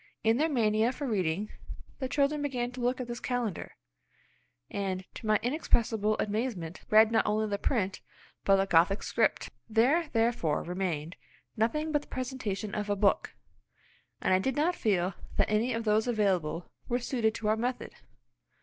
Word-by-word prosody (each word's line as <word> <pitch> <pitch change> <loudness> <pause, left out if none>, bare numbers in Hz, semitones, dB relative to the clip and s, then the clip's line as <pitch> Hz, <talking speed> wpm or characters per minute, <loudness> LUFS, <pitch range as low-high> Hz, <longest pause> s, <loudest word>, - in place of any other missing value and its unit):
In 225 +1 +3
their 315 +4 +2
mania 225 -3 +2
for 285 +2 -5
reading 200 -3 -1 0.5
the 260 -2 -3
children 290 +2 +1
began 250 -4 -2
to 250 0 -7
look 250 +2 0
at 255 - -3
this 240 -1 -5
calendar, 240 -7 -3 0.9
and, 190 -2 -3
to 220 - -8
my 215 -1 +4
inexpressible 225 -5 +1
amazement, 205 -6 -2
read 220 +1 +6
not 225 - +3
only 215 +1 +1
the 200 -1 -2
print, 200 -7 -1 0.4
but 195 - +5
the 195 0 +2
Gothic 185 +2 +3
script. - - 0 0.2
There 270 +9 +3
therefore 225 -10 +1
remained 175 -3 -3 0.4
nothing 300 +8 0
but 295 -1 +2
the - - -17
presentation 235 -6 -4
of 210 0 -3
a 205 - +2
book, 200 0 +1 0.9
and - - +3
I 185 - +5
did 265 +6 -1
not 320 +5 +2
feel 190 - +1 0.2
that - - +2
any 220 +4 +2
of 230 -1 -2
those 215 +1 +2
available 185 -8 0 0.2
were 245 - +2
suited 235 -3 0
to 215 - -3
our 215 - +4
method. 245 +3 -3
220 Hz, 170 wpm, -30 LUFS, 200-250 Hz, 0.9 s, read